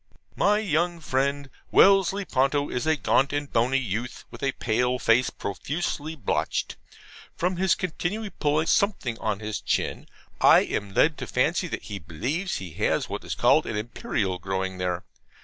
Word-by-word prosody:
My 205 +1 +3
young 175 -4 0
friend 140 -1 -1 0.2
Wellesley 195 0 +5
Ponto 140 +1 +1
is 125 +5 -2
a 160 - +4
gaunt 140 -2 +2
and 145 -1 -3
bony 120 +3 +3
youth, 120 0 -4
with - - -11
a 135 -1 0
pale 125 +2 0
face 125 +1 +3
profusely 150 - -4
blotched. 125 -10 -1 0.6
From 180 +1 -1
his 185 -1 +3
continually 195 +4 -3
pulling 150 +2 0
something 185 - +1
on 105 -1 -2
his 105 -1 -4
chin, - - -1 0.3
I - - +7
am 100 -1 -3
led 150 0 +3
to - - -5
fancy 165 +8 +1
that - - -5
he 100 0 -6
believes 130 - -3
he 95 -3 -6
has - - 0
what - - -5
is - - -4
called - - +4
an 110 - -2
Imperial 105 -4 -2
growing 95 0 -3
there. 90 -1 -2
135 Hz, 165 wpm, -26 LUFS, 105-170 Hz, 0.6 s, I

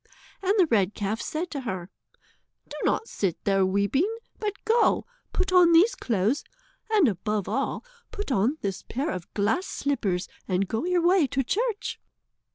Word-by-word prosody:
And 390 +2 +2
the 375 - +6
red 210 - +1
calf 210 +2 -2
said 335 +3 -3
to 280 - -3
her: 190 -7 -5 0.8
"Do - - -9
not 450 - +1
sit 190 -5 -1
there 195 -1 +3
weeping, 200 - +1 0.3
but 420 -2 -1
go, 455 +1 +3 0.3
put 375 0 -1
on 350 -2 +7
these 365 +8 +6
clothes, 225 +4 0 0.5
and 420 -8 +4
above 210 0 -1
all, - - -2 0.2
put 410 -8 -5
on 245 +6 +2
this 195 -2 -3
pair 275 +5 -3
of 180 -2 -6
glass 220 - +1
slippers, 210 -11 -1 0.2
and 185 0 +1
go 225 - -2
your 355 -1 +1
way 355 -4 +5
to 270 +1 0
church." 425 - -2
270 Hz, 165 wpm, -26 LUFS, -, 0.8 s, on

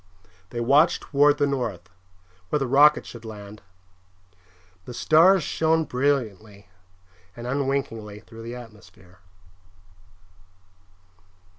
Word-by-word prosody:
They 120 - -6
watched 145 +8 +3
toward 145 +1 +3
the 145 - +2
north, 115 -11 -3 0.6
where - - +1
the 135 - -1
rocket 145 +4 +4
should 120 -1 -11
land. 105 -1 -10 1.2
The 125 - -9
stars 170 +6 +4
shone 160 +2 +1
brilliantly 110 -8 -2 0.7
and 120 - -9
unwinkingly 125 -6 -3
through 115 0 -13
the 115 +2 -7
atmosphere. 105 -6 -15
125 Hz, 100 wpm, -24 LUFS, 110-145 Hz, 1.2 s, rocket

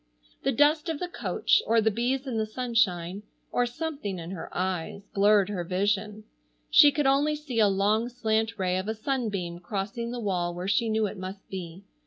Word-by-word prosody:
The - - +1
dust 300 +6 +3
of 320 - -1
the 360 - -3
coach, 390 +4 +1
or 230 0 +4
the 220 0 +2
bees 250 +5 -1
in 240 -4 -2
the 215 - -1
sunshine, 215 -6 0 0.3
or 245 0 +1
something 245 - -4
in 170 +1 -7
her 180 -4 -6
eyes 185 +1 -3
blurred 205 0 +4
her 190 -4 -2
vision. 205 +4 -1 0.5
She 300 -2 +8
could 295 0 0
only 285 +3 +3
see 285 -6 -4
a 215 - +6
long 205 +4 +1
slant 225 -2 -1
ray 185 -1 0
of 190 - -5
a 220 - -2
sunbeam 210 -8 -2
crossing 200 +5 -4
the 245 0 -4
wall 180 -5 -1
where 180 +2 -4
she 210 +4 +2
knew 220 0 +1
it 200 -1 -5
must 190 +1 -7
be. 180 -1 -7
215 Hz, 195 wpm, -27 LUFS, 190-245 Hz, 0.5 s, She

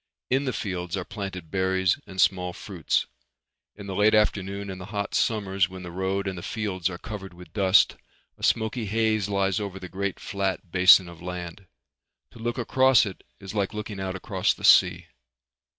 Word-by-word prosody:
In 135 +2 +2
the 130 - 0
fields 90 -5 -3
are 90 - -4
planted 95 -6 -7
berries 95 +2 +1
and 95 -1 -9
small 90 -2 +2
fruits. 90 -3 -1 0.7
In 100 - -10
the 95 - -5
late 105 +3 +4
afternoon 100 -1 0
in 95 - -8
the 90 - -7
hot 100 -1 -4
summers 100 -4 +1
when 95 0 -9
the 90 - -7
road 95 +2 -2
and 95 - -3
the 85 - -7
fields 95 -4 -2
are 90 - -6
covered 95 -3 -8
with 90 -2 -14
dust, 95 -1 +4 0.4
a - - -21
smoky 110 0 0
haze 110 -1 +1
lies 100 0 +1
over 100 -2 -5
the 95 - -7
great 95 +2 -3
flat 95 -3 -3
basin 90 0 +7
of 85 -1 -12
land. 90 +1 -7 0.6
To - - -15
look 120 +2 -3
across 130 0 +4
it 95 -3 -8 0.2
is 95 0 -8
like 105 0 -1
looking 105 -1 -5
out 95 -1 -3
across 95 - 0
the - - -14
sea. - - +5
95 Hz, 185 wpm, -26 LUFS, 95-105 Hz, 0.7 s, basin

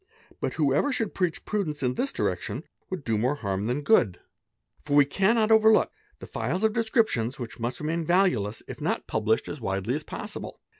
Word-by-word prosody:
But - - -2
__ - - -9
whoever 150 - +2
should 225 -5 -1
preach 180 -3 -1
prudence 165 -9 -2
in 125 -1 +1
this 270 - -1
direction - - -2 0.3
would 185 -5 -4
do 110 -4 0
more 125 +6 +1
harm 100 -6 -2
_ - - -1
than 130 +5 -1
good; 115 - +3 0.6
for 145 -1 -1
we 145 -1 +7
cannot 215 - +2
overlook 220 0 +5 0.3
the - - -10
files 155 - -2
of 220 -1 +3
descriptions 220 - +1
which 120 -1 -7
must 120 +2 -2
"Yemain 165 +2 -1
valueless 145 - +1
if - - -8
not - - -1
published 110 0 0
as 145 - -6
widely 95 +3 -1
as 150 +2 -2
possible. 210 +5 -7
150 Hz, 195 wpm, -27 LUFS, -, 0.6 s, we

